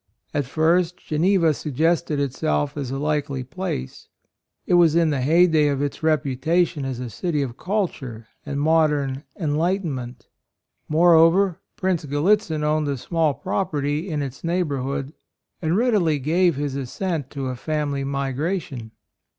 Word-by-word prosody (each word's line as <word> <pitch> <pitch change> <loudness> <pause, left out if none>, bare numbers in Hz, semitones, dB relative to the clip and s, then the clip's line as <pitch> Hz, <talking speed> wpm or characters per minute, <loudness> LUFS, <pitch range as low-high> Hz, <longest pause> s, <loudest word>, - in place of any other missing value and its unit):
At 145 - 0
first 170 +4 +2
Geneva 165 0 +2
suggested 155 +1 0
itself 145 +1 -1
as 140 -4 -4
a 135 - -3
likely 145 -2 -1
place; 130 - -5 0.6
it - - 0
was 170 -3 +5
in 165 -2 +3
the 140 -3 -1
heyday 160 +1 +4
of 140 -2 0
its 145 +2 -3
reputation 155 +1 +1
as 130 -2 -4
a 125 - -4
city 150 - -2
of 120 -3 -5
culture 140 - -3 0.2
and 140 -1 -4
modern 150 -3 +1
"enlightenment." 150 -7 -2 0.6
Moreover, 170 +3 +5 0.2
Prince 185 -4 -1
Gallitzin 160 +2 +1
owned 150 0 +1
a 140 -1 -1
small 160 +1 0
property 150 +1 -2
in 150 -3 -1
its 135 -1 -7
neighbor 165 -5 0
hood, 135 +2 -3 0.5
and 165 +2 +1
readily 210 -10 +2
gave 170 +5 +2
his 140 -1 -3
as 135 -3 -4
sent 165 -8 -2
to 135 -2 -4
a 130 - -3
family 145 +1 -2
migration. 135 - -3
150 Hz, 140 wpm, -23 LUFS, 140-170 Hz, 0.6 s, was